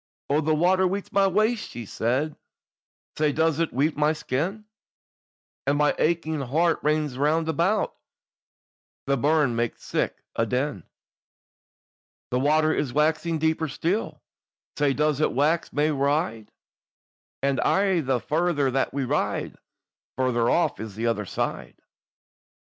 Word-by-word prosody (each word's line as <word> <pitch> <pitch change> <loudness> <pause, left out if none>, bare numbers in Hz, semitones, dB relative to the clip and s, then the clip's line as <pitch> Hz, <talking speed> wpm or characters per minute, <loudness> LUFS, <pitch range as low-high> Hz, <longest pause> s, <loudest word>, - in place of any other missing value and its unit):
"Oh, 150 +2 +3
the 155 0 +1
water 185 +4 +3
weets 195 +2 -4
my 195 -1 +4
waist," 215 +4 +1
she 120 -1 -7
said, 130 +9 -1 0.8
"Sae 150 -1 +3
does 160 +1 +1
it 165 - 0
weet 145 +5 +1
my 150 +1 +2
skin, 165 +9 -3 1.0
And 140 +1 +2
my 150 0 +3
aching 160 -1 0
heart 160 +6 +1
rins 150 -3 0
round 155 +3 +2
about, 175 +7 +1 1.1
The 140 - +2
burn 145 -2 +2
maks 115 -1 -2
sic - - -2
a 115 - +1
din. 125 - -2 1.5
"The 125 - +1
water 155 +3 +3
is 135 - -1
waxing 160 +2 +1
deeper 160 +1 0
still, 175 +9 -2 0.5
Sae 145 -2 +2
does 150 -1 +1
it - - +2
wax 155 +6 +1
mair 150 +1 +1
wide; 140 - 0 0.9
And 140 -1 +1
aye 195 -2 +2
the 130 -3 0
farther 155 -2 0
that 135 +1 -1
we 140 - 0
ride - - -1
on, - - -25 0.6
Farther 120 -2 +1
off 175 - +1
is 110 -3 -7
the 115 +2 -3
other 105 -4 -1
side. - - -4
150 Hz, 140 wpm, -25 LUFS, 135-165 Hz, 1.5 s, my